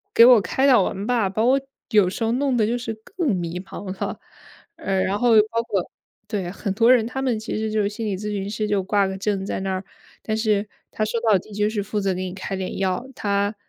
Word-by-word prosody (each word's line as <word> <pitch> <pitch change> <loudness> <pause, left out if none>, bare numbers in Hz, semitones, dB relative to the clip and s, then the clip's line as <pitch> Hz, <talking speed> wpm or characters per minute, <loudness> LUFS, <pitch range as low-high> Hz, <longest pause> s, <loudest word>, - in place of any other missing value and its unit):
给 230 - +9
我 245 -2 +8
开 265 +6 +1
导 250 -7 +6
完 195 +2 -3
吧， 235 -5 +2
把 215 +4 -1
我 265 +3 +4 0.3
有 210 -5 +5
时 185 - -5
候 225 - +1
弄 265 0 +1
得 215 - +3
就 235 +3 0
是 230 -2 -4 0.2
更 315 - +1
迷 175 0 -3
茫 195 0 -7
了。 - - -3 0.6
呃， 195 - -1
然 190 +2 0
后 245 -1 +3 0.2
包 230 0 0
括 200 -6 -2 0.4
对， 200 -5 -3
很 200 +1 -3
多 230 +3 +5
人 230 -3 +4
他 265 +2 -4
们 250 -4 0
其 220 0 -4
实 220 0 -2
就 215 0 +1
是 200 - +1
心 215 +2 -5
理 200 - -1
咨 210 +2 -4
询 200 -1 -3
师 215 0 -2
就 205 -2 +1
挂 200 +1 +2
个 190 - -4
证 195 -1 -1
在 195 - -3
那 190 0 -2
儿， 185 +1 -3 0.4
但 215 - -2
是 215 -2 +1 0.2
他 215 - -1
说 230 +2 -2
到 220 -4 +4
底 210 - -13
就 210 +1 +1
是 210 -2 -2
负 210 +1 -2
责 195 -1 0
给 185 - -4
你 180 - -5
开 195 0 -5
点 190 -1 -4
药， 190 +6 -1
他， 200 0 0
210 Hz, 270 characters per minute, -23 LUFS, 195-230 Hz, 0.6 s, 给